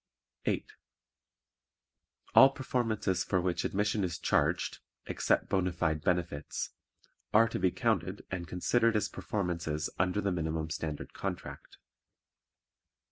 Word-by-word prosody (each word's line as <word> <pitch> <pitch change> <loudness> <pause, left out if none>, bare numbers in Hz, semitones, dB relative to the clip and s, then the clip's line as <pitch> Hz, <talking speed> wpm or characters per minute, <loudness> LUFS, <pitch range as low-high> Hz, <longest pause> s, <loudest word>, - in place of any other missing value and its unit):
8. - - 0 1.7
All 135 - +9
performances 115 -8 -1
for 95 - +1
which 90 0 0
admission 105 +1 0
is 85 -3 -2
charged - - +1 0.3
(except - - +1
bona 90 -1 +1
fide 80 -2 0
benefits) 85 -4 -1 0.6
are 115 +2 +7
to 115 - -3
be 95 - +3
counted 100 -4 -1
and 90 -2 -3
considered 115 +7 +2
as 105 0 +2
performances 85 -5 -2
under 90 +2 +2
the 100 -1 0
Minimum 80 -2 -2
Standard 80 -3 -4
Contract. - - -6
90 Hz, 115 wpm, -31 LUFS, 85-105 Hz, 1.7 s, All